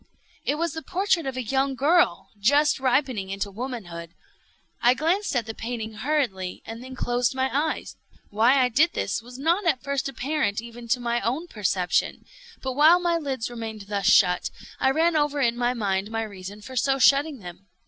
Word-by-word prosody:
It 290 - +1
was 335 0 -1
the 320 - -5
portrait 365 -3 0
of 260 -1 -4
a 255 - -2
young 270 +3 0
girl 270 - +2
just 285 +8 +3
ripening 255 -6 0
into 200 +1 -3
womanhood. 195 -8 -7 0.7
I 245 +1 +5
glanced 345 +6 0
at 240 -3 +1
the 225 - -5
painting 225 -1 -5
hurriedly, 220 -7 -2
and 225 +2 -8
then 260 0 -9
closed 245 0 0
my 265 0 -1
eyes. 310 +2 -2 0.3
Why 240 +6 +4
I 250 - +2
did 305 +8 +3
this 195 - -2
was 245 +2 -12
not 340 +7 +1
at 275 -6 +1
first 280 0 -1
apparent 265 -5 -1
even 235 +1 -9
to 245 +2 +1
my 240 0 -1
own 265 +9 -1
perception. 195 - -1 0.4
But 260 -1 -2
while 310 +6 +6
my 345 -1 +1
lids 265 -7 -3
remained 225 -2 -6
thus 200 -1 -1
shut, 180 -3 +4 0.3
I - - +3
ran 325 +4 +2
over 295 -1 +1
in 240 -3 +2
my 245 +1 0
mind 200 -3 -1
my 225 0 -2
reason 200 -1 -8
for 260 +4 -9
so 270 +2 +2
shutting 280 +2 +4
them. 180 -1 -11
250 Hz, 190 wpm, -25 LUFS, 220-285 Hz, 0.7 s, while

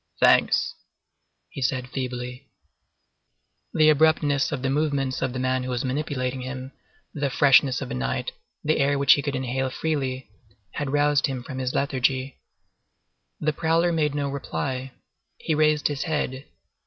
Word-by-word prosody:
"Thanks," - - +4 0.8
he 140 - -8
said 125 0 -1
feebly. 125 -1 -5 1.2
The 155 0 +4
abruptness 150 -2 +3
of 130 - -3
the 135 - +1
movements 140 -3 0
of 130 - 0
the 130 - -5
man 130 0 0
who 130 - -5
was 125 0 -2
manipulating 130 -2 -2
him, 130 +1 -6 0.4
the 145 -2 -1
freshness 135 -2 +4
of - - -7
the - - -4
night, 65 0 -2 0.3
the 155 +1 +1
air 140 +1 +2
which 140 -1 +6
he 145 - 0
could 140 -1 -3
inhale 130 +1 -1
freely, 135 -4 -2 0.4
had 145 -2 -3
roused 145 +1 +3
him 130 -3 -4
from 130 0 -6
his 130 0 -2
lethargy. 135 -1 0 1.0
The 155 0 0
prowler 165 +2 +2
made 150 -3 0
no 145 -1 -1
reply. 135 -1 -4 0.4
He 160 - -2
raised 155 -1 +3
his 145 -2 -3
head. 150 -5 -2
135 Hz, 155 wpm, -25 LUFS, 130-145 Hz, 1.2 s, which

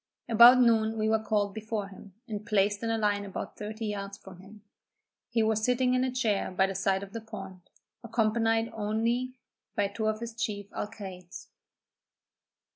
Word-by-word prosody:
About 240 +2 +8
noon 225 -2 +3
we 215 0 +1
were 220 0 +3
called 205 -2 0
before 215 -2 -4
him, 195 -1 -14
and 210 -2 -5
placed 205 -2 +1
in 230 - -2
a 225 - +1
line 205 -2 +1
about 195 -1 -6
thirty 215 +2 -5
yards 200 -1 -4
from 190 -2 -13
him. 205 +2 -15 0.7
He 230 -2 +2
was 220 0 +1
sitting 250 +1 +2
in 255 0 +2
a 260 - 0
chair 225 -6 0
by 190 +1 +2
the 195 - -3
side 195 0 0
of 200 +1 -10
the 230 - -5
pond, 195 -5 -10 0.3
accompanied 225 0 +1
only 230 +4 -1 0.4
by 200 -1 +1
two 215 +2 -2
of 215 0 0
his 235 0 -6
chief 210 -3 -4
alcaides. 190 -4 -7
215 Hz, 175 wpm, -29 LUFS, 200-225 Hz, 0.7 s, About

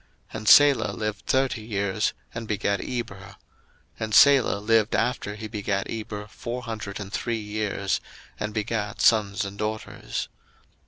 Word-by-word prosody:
01:011:014 - - -3
And 110 - -7
Salah 145 -2 +7
lived 105 -1 -4
thirty 130 -3 +1
years, 100 -1 -1 0.2
and 115 -1 -5
begat 100 -1 0
Eber: 120 -5 -4
01:011:015 100 - -12 0.6
And 110 -1 -3
Salah 135 -7 +6
lived 110 +1 +2
after 105 -4 -1
he 110 0 -6
begat 100 -2 -2
Eber 105 -2 -5
four 120 +3 -6
hundred 110 -4 -5
and 100 -1 -7
three 120 -1 -1
years, 105 -2 -2 0.4
and 105 0 -2
begat 110 0 -2
sons 105 -3 +3
and 100 +1 -8
daughters. 110 0 -4
110 Hz, 150 wpm, -25 LUFS, 100-115 Hz, 0.6 s, Salah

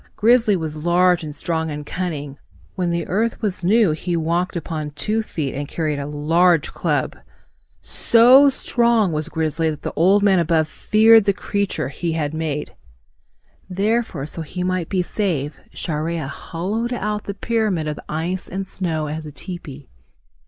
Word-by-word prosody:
Grizzly 225 -1 +4
was 155 -3 -4
large 175 0 +3
and 150 -2 -6
strong 160 0 -2
and 150 -1 -5
cunning. 145 -5 -4 0.3
When 180 -2 -1
the 170 -1 -1
earth 220 +5 -1
was 200 -5 -2
new 205 0 +4
he 170 +3 -2
walked 170 +3 -1
upon 155 -2 -4
two 215 +9 -1
feet 155 -10 -4
and 145 +1 -4
carried 155 -2 -2
a 140 - -4
large 165 +3 +2
club. - - -1 0.7
So 255 +5 +6
strong 235 -6 +1
was 155 +1 -3
Grizzly 160 0 -1
that 150 -2 -5
Old 195 +5 +4
Man 195 -3 +4
Above 160 -2 +2
feared 220 +5 +5
the 200 - +3
creature 190 -8 -2
he 165 +4 -3
had 155 -2 -2
made. 155 -2 -3 1.0
Therefore, 200 -5 -1
so 160 +2 -7
that 160 - -7
he 180 0 -3
might 185 -2 -1
be 185 -2 +1
safe, 160 -8 -2
Chareya 160 -1 -3
hollowed 205 - -3
out 210 -2 -3
the 200 - -5
pyramid 210 -9 0
of 150 - -4
ice 170 +4 -3
and 195 +1 -4
snow 165 -5 -3
as 155 +1 -5
a - - -8
tepee. 145 -2 -9
170 Hz, 160 wpm, -21 LUFS, 155-200 Hz, 1.0 s, So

